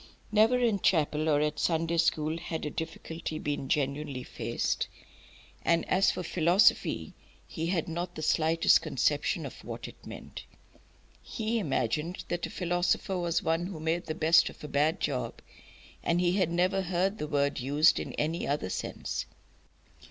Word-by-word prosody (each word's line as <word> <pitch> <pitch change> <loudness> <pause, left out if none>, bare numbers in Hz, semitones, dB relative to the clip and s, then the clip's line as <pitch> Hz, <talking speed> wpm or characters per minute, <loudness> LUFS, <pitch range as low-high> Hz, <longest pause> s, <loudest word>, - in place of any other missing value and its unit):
Never 220 +4 +5
in 230 -5 +2
chapel 155 -3 +2
or 145 -1 +3
at 150 0 -1
Sunday 165 0 +1
school 160 -1 +1
had 165 -2 -4
a 150 - -3
difficulty 160 0 -5
been 145 -3 -3
genuinely 140 -2 -1
faced. - - -2 0.8
And 170 0 +2
as 190 +1 +3
for 180 - -2
philosophy, 175 +5 +3 0.3
he 165 -2 -4
had 170 -3 0
not 175 +2 -4
the 155 - -5
slightest 160 +1 +4
conception - - 0
of - - -9
what - - -6
it - - -14
meant. - - -9 0.8
He 225 +1 -2
imagined 150 - -1
that 175 0 -2
a - - -11
philosopher 180 +1 0
was 170 -1 0
one 165 +2 0
who 185 -5 -7
made 160 +2 -1
the 155 - -3
best 165 +1 +5
of - - -14
a - - -5
bad 150 +3 +1
job, 130 -4 -2 0.6
and 170 +1 +1
he 175 -1 +3
had 185 -3 +2
never 180 +3 +1
heard 190 +3 0
the 150 - -3
word 140 -2 0
used 145 +5 +4
in - - -5
any 160 +3 -1
other 140 -10 -1
sense. - - -4
165 Hz, 160 wpm, -29 LUFS, 150-175 Hz, 0.8 s, Never